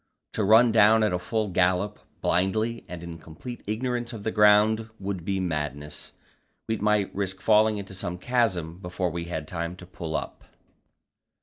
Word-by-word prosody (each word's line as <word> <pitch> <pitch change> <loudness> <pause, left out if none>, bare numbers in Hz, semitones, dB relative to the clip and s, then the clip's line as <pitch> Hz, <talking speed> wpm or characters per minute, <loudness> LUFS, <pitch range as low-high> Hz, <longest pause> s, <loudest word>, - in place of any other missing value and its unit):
To 110 - 0
run 110 +4 +6
down 110 0 +6
at 90 -4 +1
full 110 +2 -1
gallop, 90 +3 +1 0.2
blindly 110 +6 0
and 90 -1 -8
in 85 -1 -8
complete 85 +11 -9
ignorance 120 +2 -2
of 110 -3 -7
the 110 - -1
ground, 105 +1 +4
would 95 -3 -4
be 95 +2 -1
madness. 75 -4 -4 0.5
We 110 - -1
might 105 -1 +1
risk 95 -1 -3
falling 110 0 +4
into 100 -1 -7
some 90 -2 -4
chasm 90 -7 0
before 90 -1 -2
we 85 +1 -4
had 80 -3 -5
time 85 +1 -4
to 90 - -12
pull 85 -3 -6
up. - - -4
100 Hz, 165 wpm, -26 LUFS, 90-110 Hz, 0.5 s, run